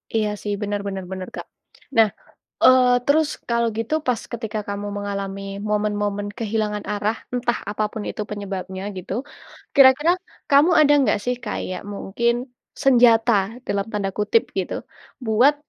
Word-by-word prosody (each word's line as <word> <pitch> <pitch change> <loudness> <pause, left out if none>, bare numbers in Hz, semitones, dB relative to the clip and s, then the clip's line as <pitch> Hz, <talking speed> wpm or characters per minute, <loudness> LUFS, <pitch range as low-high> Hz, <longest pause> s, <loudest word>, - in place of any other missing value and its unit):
Iya 215 -1 +2
sih, 205 - -2
bener 205 0 -1
bener 195 -1 -4
bener, 185 -1 -5
Kak. - - -6 0.5
Nah, 225 -1 +7 0.6
eee, 255 -1 +7 0.2
terus, 300 +2 +3 0.2
kalau 235 0 +2
gitu, 225 +6 -1
pas 245 -3 +1
ketika 220 -2 -4
kamu 200 0 -3
mengalami 200 -1 -4 0.3
momen-momen 205 -1 -1
kehilangan 215 -2 -1
arah, 210 +2 0 0.2
entah 245 -1 0
apapun 210 +1 -2
itu - - -4
penyebabnya 190 -2 -5
gitu. 185 0 -6 0.6
Kira-kira 275 +4 +7 0.4
kamu 290 +5 +6
ada 290 -1 +6
nggak 265 - +2
sih 250 0 +1
kayak, 185 -3 -4
mungkin 235 +4 0 0.5
"senjata" 240 -3 +5 0.3
dalam 200 -1 0
tanda 200 -2 -1
kutip 215 - +3 0.2
gitu, - - -3 0.5
buat 240 +7 +4
215 Hz, 140 wpm, -22 LUFS, 205-245 Hz, 0.6 s, Nah